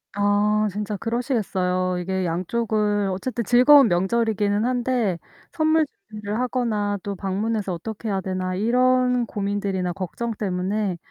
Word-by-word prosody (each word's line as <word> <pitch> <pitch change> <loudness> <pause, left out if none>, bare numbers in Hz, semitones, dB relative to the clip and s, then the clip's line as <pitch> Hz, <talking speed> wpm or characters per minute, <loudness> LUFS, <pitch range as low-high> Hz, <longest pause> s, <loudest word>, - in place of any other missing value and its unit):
아 205 +1 +2
진짜 210 +1 -3
그러시겠어요. 190 -6 -1
이게 190 +1 -2
양쪽을 205 +3 0
어쨌든 235 +6 -3
즐거운 255 +3 +7
명절이기는 205 +2 +1
한데 245 -6 0 0.3
선물 315 -1 +2 0.2
준비를 210 +1 -4
하거나 220 -5 -1
또 200 +1 -4
'방문해서 200 +1 -2
어떻게 220 +6 -6
해야 195 -1 -1
되나?' 185 0 -3
이런 250 +4 +2
고민들이나 200 -4 -2
걱정 195 +6 -4
때문에 195 0 -1
210 Hz, 320 characters per minute, -23 LUFS, 190-235 Hz, 0.3 s, 즐거운